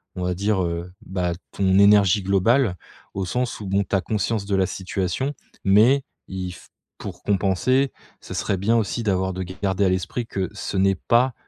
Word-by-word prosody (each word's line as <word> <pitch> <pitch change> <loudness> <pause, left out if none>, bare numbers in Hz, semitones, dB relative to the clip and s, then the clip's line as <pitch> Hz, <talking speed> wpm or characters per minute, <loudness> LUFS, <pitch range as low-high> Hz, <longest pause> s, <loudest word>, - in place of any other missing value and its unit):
on 90 - -4
va 90 0 -1
dire, 100 +1 +1
heu, 85 +1 -3
bah, 90 -2 -1 0.2
ton 95 -1 +2
énergie 100 -1 +5
globale, 100 +3 +2 0.4
au 95 - -1
sens 125 +7 -2
où, 100 - -6
bon, 100 +1 +1
tu - - +1
as 95 - +2
conscience 105 +2 -1
de 100 -1 0
la 95 - +3
situation, 95 - -2 0.3
mais 115 +8 +5 0.2
il 95 -1 -5
f - - -15 0.3
pour - - -8
compenser, 105 +7 +2 0.3
ce - - -8
serait 100 - -1
bien 110 +5 +2
aussi 115 +2 -1
d'avoir 95 -2 0
de 95 +1 -3
garder 95 +2 -2
à - - +3
l'esprit 95 +6 -2
que 95 -5 -3
ce 100 -1 -4
n'est 95 0 +3
pas 120 +7 +2
95 Hz, 190 wpm, -23 LUFS, 95-110 Hz, 0.4 s, énergie